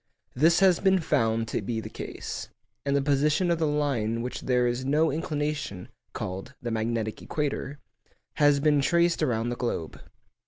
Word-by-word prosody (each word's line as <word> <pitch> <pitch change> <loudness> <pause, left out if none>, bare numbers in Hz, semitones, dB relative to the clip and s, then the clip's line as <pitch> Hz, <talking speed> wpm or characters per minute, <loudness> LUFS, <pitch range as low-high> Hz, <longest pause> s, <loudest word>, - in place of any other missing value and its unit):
This 165 +7 +4
has 185 -3 +5
been 190 -1 +4
found 115 -7 +1
to - - -1
be 110 +3 -2
the - - -6
case, - - -6 0.4
and 140 - +2
the 140 - +2
position 150 +5 +2
of 170 - +1
the 160 - +2
line 140 -7 0
along 115 - -2
which 125 - -5
there 125 -1 +2
is 120 +1 -1
no 150 +4 +2
inclination 150 - -3 0.2
(called 95 +1 -6
the 120 - -4
magnetic 110 -1 -2
equator) 145 -1 -3 0.6
has 145 -1 +5
been 145 0 +3
traced 170 +3 +2
around 115 -1 0
the 120 - -2
globe. 115 -10 -4
140 Hz, 170 wpm, -27 LUFS, 115-150 Hz, 0.6 s, has